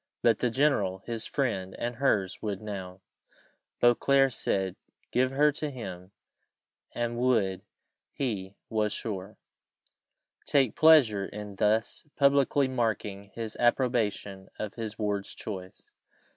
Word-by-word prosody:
But 115 -3 +4
the 125 - +1
general, 110 -8 +1
his 115 -2 -4
friend 100 -9 -2
and 120 0 -3
her's, 105 -9 +1
would 100 -3 -3
now, 95 -3 -7 0.8
Beauclerc 135 +3 +4
said, 95 -4 -1 0.4
give 130 +1 +2
her 145 +3 +3
to 150 +1 -3
him; 95 -8 -8 0.8
and 120 0 -2
would, 110 -7 +2 0.5
he 100 -8 -3
was 105 -1 0
sure, 100 -2 -5 1.1
take 135 -5 +3
pleasure 135 -12 +6
in 105 -1 -8
thus 110 +3 +1
publicly 140 0 +3
marking 110 -5 -2
his 115 -2 -5
approbation 115 -6 0
of 105 -2 -4
his 110 -2 -5
ward's 105 -2 -2
choice. 95 -3 -8
110 Hz, 115 wpm, -29 LUFS, 100-130 Hz, 1.1 s, pleasure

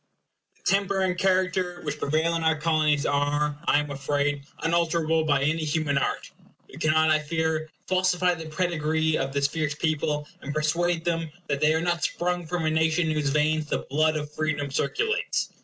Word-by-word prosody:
The - - -32
temper 195 0 +1
and 185 -1 +1
character 185 -1 +1
which 150 - -4
prevail 155 +3 +1
in 165 - -1
our 160 -1 +2
Colonies 155 -2 +2
are, 145 +1 0
I - - +4
am 150 0 -2
afraid, 140 0 -1 0.2
unalterable 165 -1 +1
by 140 -3 +2
any 155 +2 +1
human 150 -2 0
art. - - -2 0.4
We - - -13
cannot, 155 0 +3
I 155 - +4
fear, 160 0 -1 0.2
falsify 185 -1 +2
the 160 -1 -7
pedigree 160 -2 0
of 135 - -2
this 140 0 0
fierce 155 -1 -2
people, 150 -1 -1
and 145 +1 -5
persuade 165 +2 0
them 165 -2 -1
that 140 -3 -2
they 155 +1 +4
are 160 - +1
not 175 -3 -1
sprung 175 0 -1
from 175 -1 -2
a 155 - +2
nation 160 +1 +2
in - - +1
whose 150 -2 0
veins 150 +1 +1
the - - -2
blood 155 +2 +2
of 150 -1 -4
freedom 145 -3 -2
circulates. 440 - -1
155 Hz, 185 wpm, -26 LUFS, 150-170 Hz, 0.4 s, I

